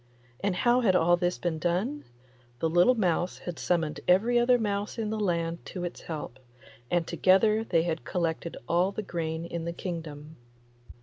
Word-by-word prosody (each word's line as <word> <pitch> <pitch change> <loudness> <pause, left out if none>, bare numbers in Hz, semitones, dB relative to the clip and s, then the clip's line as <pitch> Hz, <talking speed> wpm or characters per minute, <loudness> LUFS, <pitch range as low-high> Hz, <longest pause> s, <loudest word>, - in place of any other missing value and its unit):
And 200 -2 +1
how 240 +6 +3
had 195 -6 +3
all 175 0 +5
this 175 0 -1
been 165 -3 -2
done? 190 - -1 0.5
The 165 - 0
little 175 +9 +5
mouse 180 -4 0
had 175 -2 -7
summoned 165 -4 0
every 225 +7 +4
other 245 +1 +4
mouse 205 -1 -2
in 215 -2 -2
the 220 - -2
land 170 -4 -1
to 180 - -5
its 175 - -5
help, 150 -6 -6 0.5
and 175 -1 +1
together 210 +6 +3
they 170 -7 +2
had 165 -1 -2
collected 170 -2 -2
all 175 +3 +2
the 215 - -4
grain 165 -3 -3
in 170 -1 -5
the 170 - -3
kingdom. 160 -4 -7
175 Hz, 175 wpm, -28 LUFS, 165-205 Hz, 0.5 s, all